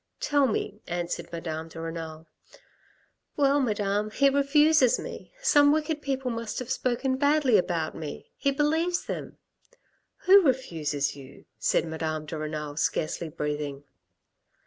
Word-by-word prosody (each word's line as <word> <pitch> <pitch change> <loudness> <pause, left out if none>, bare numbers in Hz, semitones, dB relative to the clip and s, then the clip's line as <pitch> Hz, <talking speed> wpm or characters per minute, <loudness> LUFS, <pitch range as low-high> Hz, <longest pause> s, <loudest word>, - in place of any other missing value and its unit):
" - - -53
Tell 285 -2 +4
me," 210 -2 -3
answered 175 -1 -3
Madame 160 -1 -5
de 165 0 -10
Renal. 165 -1 -6 0.6
" - - -37
Well, 285 0 +4
Madame, 210 -4 0
he 275 +5 +3
refuses 280 -1 +4
me, - - -8
some 290 -11 +6
wicked 310 0 0
people 265 -3 -2
must 230 -2 -4
have 255 0 -4
spoken 260 +1 0
badly 285 -3 +3
about 170 -4 +1
me. 155 -2 -8
He 280 - 0
believes 320 +5 +1
them." - - -6 0.4
" - - -43
Who 390 +2 +8
refuses 160 - 0
you? 140 -1 -13
" - - -50
said - - +2
Madame 160 -1 -3
de 155 - -6
Renal, 150 -1 -5
scarcely 160 +1 -1
breathing. 150 -2 -4
210 Hz, 145 wpm, -27 LUFS, -, 0.6 s, Who